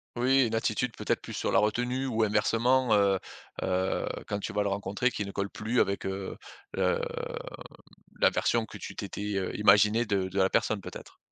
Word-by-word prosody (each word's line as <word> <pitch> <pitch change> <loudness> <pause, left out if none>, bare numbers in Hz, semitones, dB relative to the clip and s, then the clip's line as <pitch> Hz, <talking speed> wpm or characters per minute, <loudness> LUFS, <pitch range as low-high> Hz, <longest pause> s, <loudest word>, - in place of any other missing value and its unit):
Oui, 130 +1 +3
une 115 - -2
attitude 115 +1 -1
peut-être - - -1
plus - - -8
sur - - -1
la - - +5
retenue 125 +5 0
ou 115 -3 +1
inversement, 115 +4 +2
heu 100 -2 +3 0.4
heu, 95 0 0 0.2
quand 100 - -2
tu - - -4
vas 105 0 0
le 100 - 0
rencontrer, 100 +5 -1
qui 105 - -3
ne 100 - -6
colle 100 0 -2
plus 115 +4 -1
avec, 100 +1 +1
heu, 95 0 -4 0.4
le 480 - +1
mmh, 480 - -4 1.2
la - - +6
version 115 -1 +1
que - - -10
tu - - -8
t'étais, 105 0 -4
heu, 95 -1 -2
imaginée 105 +3 +5
de 100 -3 +1
de 95 - -4
la 95 0 +3
personne 110 - +1
peut-être. - - -10
105 Hz, 195 wpm, -29 LUFS, 100-120 Hz, 1.2 s, la